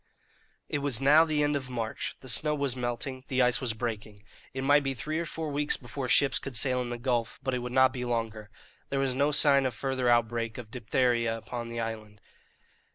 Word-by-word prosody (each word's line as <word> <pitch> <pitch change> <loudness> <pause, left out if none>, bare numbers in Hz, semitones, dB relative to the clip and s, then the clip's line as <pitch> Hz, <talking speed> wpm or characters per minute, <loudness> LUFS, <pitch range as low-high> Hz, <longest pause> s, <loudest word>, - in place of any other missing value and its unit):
It - - -2
was 140 -5 +1
now 150 +4 +6
the 150 -2 0
end 145 0 +1
of 130 -2 -4
March; 115 -3 -4
the 130 - -12
snow 150 +6 +3
was 140 -3 0
melting; 125 +1 -4
the 130 -1 +2
ice 125 +1 +2
was 125 -3 -1
breaking; 110 -3 -5 0.3
it 130 0 -4
might 145 +2 +5
be 135 -1 -2
three 155 +7 -3
or 170 - -3
four 160 -1 -5
weeks 145 +1 +1
before 125 +1 -6
ships 140 +1 +3
could 135 -3 -7
sail 125 +2 +1
in 125 - -4
the 120 - -4
gulf, 120 -1 -2
but 130 0 -1
it 125 - 0
would 125 0 -5
not 130 0 +4
be 125 -2 -4
longer. 115 -3 -3 0.4
There 140 - -2
was 135 -2 0
no 140 +3 +1
sign 140 -2 +6
of 125 - -5
further 130 -1 -1
outbreak 115 -1 +1
of 115 -3 -9
diphtheria 115 -1 0
upon 115 +1 -6
the 115 0 -5
island. 110 -2 -6
125 Hz, 220 wpm, -28 LUFS, 115-140 Hz, 0.4 s, now